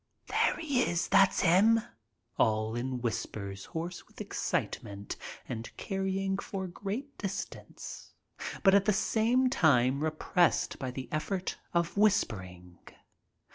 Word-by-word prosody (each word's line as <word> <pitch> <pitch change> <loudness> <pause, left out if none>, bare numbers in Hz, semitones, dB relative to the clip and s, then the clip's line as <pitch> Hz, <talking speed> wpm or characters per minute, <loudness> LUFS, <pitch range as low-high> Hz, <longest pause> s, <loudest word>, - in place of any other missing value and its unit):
"There - - +2
he 285 -6 +1
is." 175 -7 +1
"That's 195 -1 +5
'im." 210 +7 +6 0.6
All 110 -1 +2
in 125 +1 -2
whispers 100 -4 -4
hoarse 170 +2 -5
with - - -17
excitement 100 0 -3 0.3
and 115 -2 -5
carrying 195 0 -1
for 195 -2 -4
great 205 +10 -5
distance, 195 -2 -6 0.5
but 195 -2 +7
at 200 -1 +5
the 210 - +4
same 230 +5 +2
time 140 - +3
repressed 160 +2 +1
by 130 - -3
the 130 0 -6
effort 185 +4 -2
of 170 +2 0
whispering. 90 - 0
175 Hz, 120 wpm, -31 LUFS, 120-200 Hz, 0.6 s, but